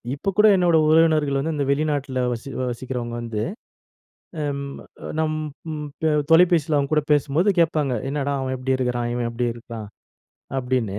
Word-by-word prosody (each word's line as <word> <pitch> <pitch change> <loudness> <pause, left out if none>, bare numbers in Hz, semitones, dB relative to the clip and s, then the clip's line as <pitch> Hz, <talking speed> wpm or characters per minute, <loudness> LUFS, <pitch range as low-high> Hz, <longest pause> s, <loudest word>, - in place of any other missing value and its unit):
இப்போ 145 - -2
கூட 215 +1 +7
என்னோட 175 -2 +4
உறவினர்கள் 155 -3 +4
வந்து 160 +4 -1
இந்த 145 -1 0
வெளிநாட்ல 140 -3 -1
வசி 120 +4 -7 0.2
வசிக்கிறவங்க 120 -1 -5
வந்து, 115 -2 -3 1.0
அம் 140 -1 -2 0.6
நம் 155 -1 0 0.4
ம் 150 -1 -5 0.5
தொலைபேசில 165 -3 +5
அவங்க 140 0 -1
கூட 150 -1 +3
பேசும்போது 150 +7 +2
கேட்பாங்க, 155 -6 +2
என்னடா 140 0 -1
அவன் 130 0 -2
எப்டி 130 +1 0
இருக்குறான்? 120 -2 -1
இவன் 120 -1 -1
எப்டி 120 +1 -1
இருக்கான்? 115 -2 -8 0.7
அப்டின்னு. 125 -6 -1
140 Hz, 140 wpm, -23 LUFS, 125-155 Hz, 1.0 s, கூட